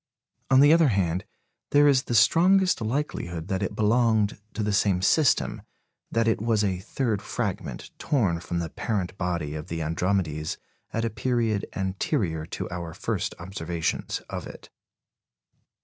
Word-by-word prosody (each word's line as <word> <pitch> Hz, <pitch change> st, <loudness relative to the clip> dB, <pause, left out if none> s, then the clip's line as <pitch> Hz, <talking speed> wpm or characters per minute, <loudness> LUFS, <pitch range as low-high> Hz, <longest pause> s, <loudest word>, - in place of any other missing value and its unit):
On 135 Hz, 0 st, +6 dB
the 145 Hz, +2 st, +7 dB
other 165 Hz, -2 st, +5 dB
hand, 95 Hz, -5 st, 0 dB, 0.4 s
there 145 Hz, 0 st, +5 dB
is 135 Hz, -2 st, +4 dB
the 120 Hz, -, -1 dB
strongest 180 Hz, -, +4 dB
likelihood 110 Hz, -, -3 dB
that 95 Hz, -1 st, -1 dB
it 100 Hz, -, -2 dB
belonged 110 Hz, -2 st, +2 dB, 0.2 s
to 110 Hz, -, -1 dB
the 105 Hz, 0 st, 0 dB
same 100 Hz, -2 st, +2 dB
system 150 Hz, +6 st, +3 dB, 0.5 s
that 115 Hz, 0 st, +1 dB
it 115 Hz, -, +1 dB
was 110 Hz, -2 st, +2 dB
a 95 Hz, -3 st, 0 dB
third 110 Hz, +1 st, -2 dB
fragment, 105 Hz, -5 st, -4 dB
torn 100 Hz, -, +1 dB
from 85 Hz, 0 st, -4 dB
the 85 Hz, -1 st, -2 dB
parent 95 Hz, -4 st, -2 dB
body 85 Hz, -5 st, -2 dB
of 75 Hz, 0 st, -6 dB
the 80 Hz, -1 st, -3 dB
Andromedes 80 Hz, -2 st, -1 dB, 0.3 s
at 115 Hz, +1 st, -1 dB
a 115 Hz, -, -1 dB
period 115 Hz, -3 st, 0 dB
anterior 95 Hz, -, -1 dB
to -, -, -5 dB
our 85 Hz, -2 st, -5 dB
first -, -, -2 dB
observations 85 Hz, -2 st, -3 dB
of -, -, -5 dB
it. -, -, -12 dB
100 Hz, 150 wpm, -26 LUFS, 85-120 Hz, 0.5 s, the